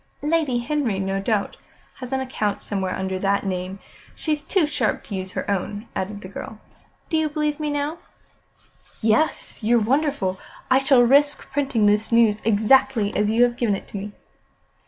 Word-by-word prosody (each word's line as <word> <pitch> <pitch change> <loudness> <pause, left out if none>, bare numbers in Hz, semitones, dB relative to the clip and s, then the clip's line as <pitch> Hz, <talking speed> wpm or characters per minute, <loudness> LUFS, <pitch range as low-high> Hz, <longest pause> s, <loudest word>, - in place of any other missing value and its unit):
"Lady 300 -5 +1
Henry, 240 -4 -1
no 195 0 -1
doubt, 205 -1 -1 0.4
has 255 -1 -8
an 265 - 0
account 215 -6 -2
somewhere 190 -2 -2
under 190 0 -3
that 200 +1 0
name. 185 0 -3 0.4
She's 305 -2 -1
too 355 +2 +2
sharp 250 -7 -1
to 200 - -6
use 190 0 -5
her - - -4
own," 205 +2 -3
added 205 +2 -4
the 185 - -8
girl. 205 +3 -8 0.5
"Do 320 - +2
you 315 -1 +1
believe 300 0 -1
me 305 -1 -2
now?" 290 +3 -2 1.0
"Yes. 225 +8 0
You're 230 +2 +3
wonderful. 235 -5 0 0.3
I 260 - +6
shall 270 -2 +5
risk 285 +4 +3
printing 270 -7 +1
the 210 +1 +4
news 230 -2 +4
exactly 220 0 +3
as 210 0 +2
you 230 +3 +4
have 240 -1 +2
given 225 -5 +1
it - - -8
to - - -6
me." 205 +1 -6
225 Hz, 175 wpm, -23 LUFS, 200-285 Hz, 1.0 s, I